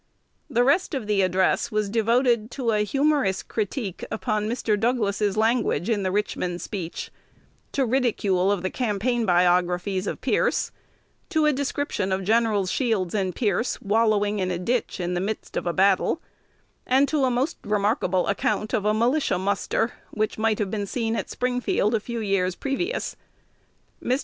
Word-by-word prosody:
The 240 Hz, -, +3 dB
rest 290 Hz, +5 st, +2 dB
of 255 Hz, -5 st, -3 dB
the 205 Hz, -1 st, +2 dB
address 185 Hz, 0 st, +2 dB
was 215 Hz, -1 st, 0 dB
devoted 230 Hz, +1 st, +2 dB
to 245 Hz, -4 st, 0 dB
a 210 Hz, -1 st, +2 dB
humorous 275 Hz, -4 st, +1 dB
critique 210 Hz, -2 st, -3 dB
upon 215 Hz, -1 st, -1 dB
Mr. 225 Hz, -2 st, 0 dB
Douglas's 210 Hz, -3 st, 0 dB
language 220 Hz, -5 st, +1 dB
in 210 Hz, -3 st, +1 dB
the 185 Hz, -1 st, -1 dB
Richmond 180 Hz, -3 st, -1 dB
speech, 180 Hz, -6 st, -5 dB, 0.6 s
to 275 Hz, -, +2 dB
ridicule 210 Hz, -7 st, +1 dB
of 195 Hz, -3 st, -1 dB
the 185 Hz, -, -1 dB
campaign 235 Hz, 0 st, 0 dB
biographies 180 Hz, +2 st, +2 dB
of -, -, -3 dB
Pierce, -, -, +1 dB, 0.6 s
to 315 Hz, -5 st, +2 dB
a 300 Hz, -, +4 dB
description 275 Hz, -7 st, -2 dB
of 190 Hz, +1 st, 0 dB
Gens. 215 Hz, -2 st, +2 dB
Shields 220 Hz, -9 st, 0 dB
and 190 Hz, -4 st, -1 dB
Pierce 220 Hz, +1 st, 0 dB
wallowing 210 Hz, -1 st, +2 dB
in 185 Hz, -1 st, 0 dB
the 180 Hz, -, -1 dB
ditch 230 Hz, +6 st, -1 dB
in 180 Hz, 0 st, -2 dB
the 175 Hz, -, -1 dB
midst 210 Hz, +3 st, -4 dB
of -, -, -2 dB
a -, -, +2 dB
battle, 195 Hz, -, +2 dB, 0.7 s
and 265 Hz, +3 st, +4 dB
to 290 Hz, 0 st, +1 dB
a -, -, +2 dB
most 255 Hz, +6 st, 0 dB
remarkable 205 Hz, -3 st, +1 dB
account 210 Hz, +2 st, -1 dB
of 210 Hz, -4 st, 0 dB
a 210 Hz, 0 st, +3 dB
militia 245 Hz, 0 st, +2 dB
muster 200 Hz, +4 st, 0 dB, 0.2 s
which 215 Hz, 0 st, -2 dB
might 220 Hz, -1 st, +2 dB
have 205 Hz, -3 st, -2 dB
been 205 Hz, -2 st, -2 dB
seen 225 Hz, +1 st, -1 dB
at -, -, -3 dB
Springfield 245 Hz, -3 st, 0 dB
a 225 Hz, -, +2 dB
few 235 Hz, +2 st, -5 dB
years 190 Hz, -3 st, 0 dB
previous. 350 Hz, -, -2 dB, 0.9 s
Mr. 255 Hz, +2 st, +1 dB
215 Hz, 165 wpm, -24 LUFS, 195-245 Hz, 0.9 s, a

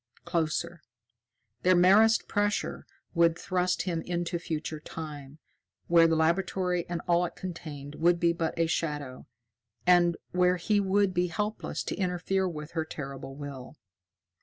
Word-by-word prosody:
Closer. 165 Hz, 0 st, -1 dB, 0.8 s
Their 185 Hz, 0 st, +4 dB
merest 205 Hz, +6 st, +5 dB
pressure 205 Hz, 0 st, -1 dB, 0.3 s
would 170 Hz, -1 st, +3 dB
thrust 180 Hz, -2 st, 0 dB
him 170 Hz, -3 st, -2 dB
into 175 Hz, 0 st, -2 dB
Future 155 Hz, -2 st, -4 dB
Time, 150 Hz, -3 st, -8 dB, 0.5 s
where 170 Hz, -1 st, +6 dB
the 165 Hz, -, +2 dB
laboratory 180 Hz, +2 st, +1 dB
and 175 Hz, -1 st, -3 dB
all 175 Hz, 0 st, +3 dB
it -, -, -7 dB
contained 150 Hz, -6 st, -7 dB
would 170 Hz, +3 st, +2 dB
be 170 Hz, -1 st, +3 dB
but 165 Hz, -1 st, -2 dB
a 165 Hz, -, +3 dB
shadow, 150 Hz, -5 st, -3 dB, 0.6 s
and 175 Hz, -1 st, +5 dB
where 180 Hz, 0 st, +3 dB
he 205 Hz, +4 st, +1 dB
would 200 Hz, 0 st, +2 dB
be 180 Hz, 0 st, +1 dB
helpless 210 Hz, +5 st, -3 dB
to -, -, -3 dB
interfere 185 Hz, 0 st, 0 dB
with 150 Hz, -2 st, -7 dB
her 160 Hz, -2 st, -1 dB
terrible 135 Hz, -3 st, -7 dB
will. 140 Hz, -1 st, -8 dB
170 Hz, 140 wpm, -29 LUFS, 160-180 Hz, 0.8 s, where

